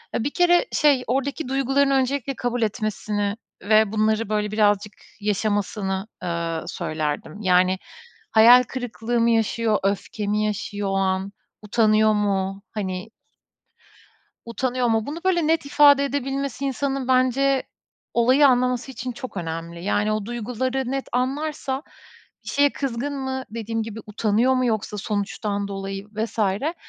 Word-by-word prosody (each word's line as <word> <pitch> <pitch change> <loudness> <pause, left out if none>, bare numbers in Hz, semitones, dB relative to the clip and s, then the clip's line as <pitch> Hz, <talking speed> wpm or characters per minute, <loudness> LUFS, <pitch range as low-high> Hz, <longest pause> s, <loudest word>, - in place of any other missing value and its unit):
E, - - 0
bir 280 - 0
kere 350 +6 +4
şey 285 -4 +3
oradaki 275 +4 -1
duygularını 275 +1 +2
öncelikle 270 0 0
kabul 245 0 -2
etmesini 210 -2 -1 0.3
ve 215 0 +4
bunları 220 0 +1
böyle 210 -1 -1
birazcık 210 -1 +2 0.3
yaşamasını, 205 -1 -1 0.2
eee, 170 -2 -2
söylerdim. 155 +4 -4
Yani, 185 -1 +3 0.5
hayal 235 +3 +8
kırıklığı 240 -1 -3
mı 230 0 +3
yaşıyor, 225 -1 +1
öfke 200 +1 -2
mi 210 +1 +1
yaşıyor 205 -1 -3
o 195 - -1
an, 190 0 0 0.3
utanıyor 215 0 +3
mu, 195 -2 -1
hani. 190 -1 -4 1.4
Utanıyor 245 +1 -1
mu? 225 -1 +1
Bunu 300 +3 -4
böyle 345 -4 +2
net 320 -2 +1
ifade 285 -1 +6
edebilmesi 275 -1 -3
insanın 270 -1 -2
bence 260 +1 +3 0.5
olayı 255 +5 +5
anlaması 250 0 +1
için 255 -1 -5
çok 255 -3 -8
önemli. 170 0 -5
Yani, 205 +1 +1
o 215 -1 -2
duyguları 250 +2 -2
net 270 0 -2
anlarsa 270 +1 -2 0.6
bir - - -8
şeye 285 0 +3
kızgın 275 +1 -3
mı 265 0 -3
dediğim 225 0 -3
gibi 225 0 -7
utanıyor 220 +4 +2
mu 255 -1 +1
yoksa 215 -2 -2
sonuçtan 205 0 -2
dolayı 195 0 -5
vs. 220 +2 -4
Ya 215 - 0
225 Hz, 135 wpm, -23 LUFS, 205-265 Hz, 1.4 s, hayal